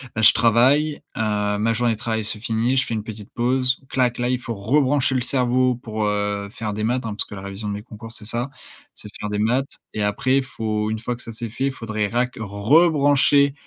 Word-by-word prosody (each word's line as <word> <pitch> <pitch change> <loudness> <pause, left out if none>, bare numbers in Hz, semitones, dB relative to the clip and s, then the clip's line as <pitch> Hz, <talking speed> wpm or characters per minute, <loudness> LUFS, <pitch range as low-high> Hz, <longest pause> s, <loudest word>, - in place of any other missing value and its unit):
bah, 110 - 0
je - - +10
travaille, 135 +7 +3 0.2
heu, 105 -1 0
ma 115 +2 +1
journée 120 0 +1
de - - -6
travail 110 -2 -1
se 110 - -2
finit, 115 +3 0
je 130 - +3
fais - - -4
une 110 - -3
petite 110 -1 -9
pause, 125 +1 +1
clac, 125 -2 +1
là 120 0 0
il 125 - 0
faut 120 -2 -5
rebrancher 135 +5 +2
le 130 - +1
cerveau 125 0 +2
pour, 110 -2 -4
heu, 105 -1 -1
faire 110 -3 -4
des 105 - -3
maths, 125 +2 0
hein, 110 - -3
parce - - -3
que - - -12
la 95 - -7
révision 100 +2 -6
de 100 - -2
mes 105 - -5
concours 115 0 -10
c'est 110 - -9
ça, 120 +5 0 0.4
c'est 105 - -10
faire 105 - -3
des 105 - -2
maths 125 +6 0 0.2
et 105 - -1
après 130 +6 +1
il 135 - +2
faut, 110 -4 -2
une 110 - -2
fois 120 +1 -3
que 120 - -9
ça 115 - -7
c'est 115 0 -5
fait 130 +4 -2
il - - 0
faudrait 110 -3 -2
rac 125 +2 0
rebrancher 140 - +4
115 Hz, 240 wpm, -22 LUFS, 105-130 Hz, 0.4 s, je